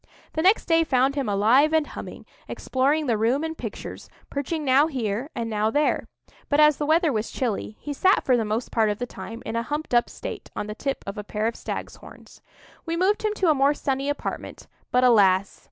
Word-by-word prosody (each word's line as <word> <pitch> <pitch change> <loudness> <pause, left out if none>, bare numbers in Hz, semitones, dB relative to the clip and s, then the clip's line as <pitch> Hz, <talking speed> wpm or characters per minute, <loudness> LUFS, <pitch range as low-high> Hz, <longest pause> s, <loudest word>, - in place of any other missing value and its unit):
The 315 - -1
next 385 +6 +4
day 330 -1 +3
found 265 -2 +2
him 275 -6 -2
alive 235 +10 +4
and 315 -2 +3
humming, - - -9 0.2
exploring 285 +4 0
the 230 -5 0
room 245 +7 +1
and 320 0 -3
pictures, - - -8 0.2
perching 295 +2 -3
now 270 +3 +5
here 245 -2 -3
and 230 - -2
now 215 -1 0
there; 295 +6 +1 0.4
but 285 - +2
as 300 -1 +6
the 295 - -2
weather 320 -1 +3
was 215 0 -2
chilly, 220 -3 -3
he 295 - -5
sat 380 +7 +3
for 255 - +4
the 235 - +1
most 220 +3 -3
part 220 -2 +2
of 205 - -1
the 245 - -3
time 230 -1 -9
in 225 - -4
a 230 - +1
humped 295 +4 -4
up 240 0 +3
state - - -7
on - - -3
the 210 - -5
tip 275 +5 -4
of 200 +2 -5
a - - -5
pair 210 +1 -3
of 230 +1 -1
stag's - - -6
horns. - - -15 0.4
We 335 -1 -3
moved 385 +4 +2
him 425 -1 -1
to 365 -6 +3
a - - +5
more 280 +1 +3
sunny 275 0 -2
apartment; 290 - -5 0.3
but, 250 0 +3
alas! 200 -5 +4
265 Hz, 220 wpm, -24 LUFS, 225-300 Hz, 0.4 s, as